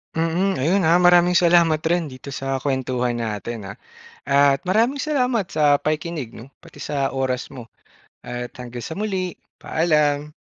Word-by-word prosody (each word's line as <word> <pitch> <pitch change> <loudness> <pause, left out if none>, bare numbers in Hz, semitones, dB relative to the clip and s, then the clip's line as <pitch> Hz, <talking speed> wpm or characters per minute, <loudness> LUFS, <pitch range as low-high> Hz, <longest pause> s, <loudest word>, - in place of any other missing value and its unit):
Mm, 165 +3 0
ayun 180 +8 +2
ha 165 +2 +4
maraming 175 0 +5
salamat 170 -3 +4
rin 170 -3 0
dito 130 +2 -9
sa 135 0 -2
kuwentuhan 130 -3 -1
natin 115 -1 -4
ha, 95 +1 -7 0.5
at 140 0 +4
maraming 230 +9 +2
salamat 250 - 0
sa 145 -5 +3
pakikinig 155 -5 -3
'no 125 +4 -12
pati - - -12
sa 135 -2 -2
oras 130 -1 -1
mo. 120 -3 -11 0.5
At 120 0 -6
hanggang 120 -1 -7
sa - - -6
muli, 190 -2 -2 0.2
paalam. 150 -2 0
150 Hz, 150 wpm, -22 LUFS, 130-175 Hz, 0.5 s, maraming